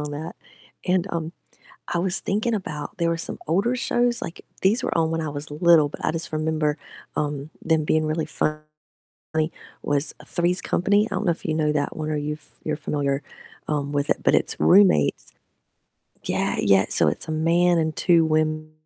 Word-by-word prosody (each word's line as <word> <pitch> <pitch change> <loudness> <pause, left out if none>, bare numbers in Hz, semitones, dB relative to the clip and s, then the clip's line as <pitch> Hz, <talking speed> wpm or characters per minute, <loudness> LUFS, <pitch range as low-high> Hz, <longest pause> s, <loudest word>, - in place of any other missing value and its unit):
on 150 0 -4
that. 155 +3 -6 0.5
And, 180 0 +2
um, 165 0 -3 0.6
I - - -1
was 185 +1 +2
thinking 215 +4 -1
about, 150 -8 -5
there 170 0 +1
were 165 - 0
some - - -1
older 200 +10 +1
shows, 240 -1 +1
like 165 - -7 0.2
these 205 +6 +3
were - - -1
on 160 -1 +1
when 165 - -1
I 155 - -3
was 145 +1 -7
little, 155 -1 +4
but - - -6
I - - +1
just 165 +1 -3
remember, 155 -1 0 0.4
um, 145 0 -2
them 160 -1 +1
being 155 +1 +1
really 155 +1 -1
funny, 155 0 -1 1.2
was 145 +1 0
Three's 175 +1 +1
Company, 205 +4 +1
I - - -4
don't - - -1
know 175 - +3
if 165 - -8
you 155 - 0
know 155 -1 +1
that 145 -1 -2
one 155 -1 -3
or 150 - -1
you've 150 +1 -4 0.2
you're 155 -1 -2
familiar, 145 -2 -2 0.5
um, 145 -1 -1
with 145 0 0
it, - - +2
but - - +3
it's - - +1
roommates 185 - +4 0.9
Yeah, - - -1
yeah, 95 0 +4
so 80 - +5
it's 75 - -2
a - - -2
man 170 +2 +3
and 160 -1 0
2 170 -2 +3
women. 155 0 0
155 Hz, 190 wpm, -23 LUFS, 150-175 Hz, 1.2 s, so